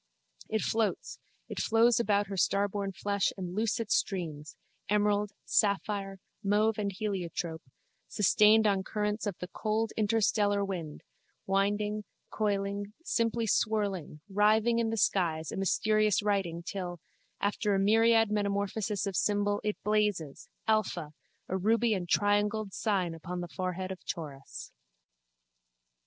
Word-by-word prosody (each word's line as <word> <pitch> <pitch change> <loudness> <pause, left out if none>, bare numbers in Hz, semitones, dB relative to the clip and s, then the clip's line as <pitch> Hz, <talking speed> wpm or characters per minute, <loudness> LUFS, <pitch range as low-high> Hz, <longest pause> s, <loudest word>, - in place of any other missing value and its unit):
It 220 - 0
floats, 220 -1 -1 0.3
it - - -5
flows 230 +1 +4
about 205 -2 +2
her 200 0 -6
starborn 200 +2 0
flesh 200 +1 0
and 180 -2 -5
loose 215 +3 0
it 225 -2 -4
streams, 155 -6 -1 0.3
emerald, 210 0 +2
sapphire, 200 -1 0 0.3
mauve 210 +2 +2
and 200 -1 -1
heliotrope, 180 -5 -3 0.5
sustained 215 +2 +4
on 200 -2 +3
currents 210 +1 -2
of 200 - -3
the 180 - -6
cold 220 +2 -1
interstellar 205 -2 +2
wind, 170 -6 -5 0.4
winding, 205 +2 0 0.3
coiling, 200 -1 -1
simply 230 -4 0
swirling, 200 -8 0
writhing 215 +3 +3
in 230 -1 +1
the 225 - -2
skies 165 -6 +1
a - - -5
mysterious 215 +2 +2
writing 190 -5 -1
till, 180 -1 -5 0.4
after 205 0 0
a - - +2
myriad 225 +2 +4
metamorphoses 205 0 -1
of 195 -2 -3
symbol, 205 +1 +1
it 210 0 -1
blazes, 210 -8 0 0.2
Alpha, 215 -8 0 0.3
a 185 - -2
ruby 225 +4 +2
and 180 -4 -3
triangled 205 0 +1
sign 190 -6 0
upon 175 +2 -6
the 175 - -5
forehead 185 +2 -4
of 190 - -8
Taurus. 145 -5 -7
205 Hz, 130 wpm, -30 LUFS, 190-215 Hz, 0.5 s, flows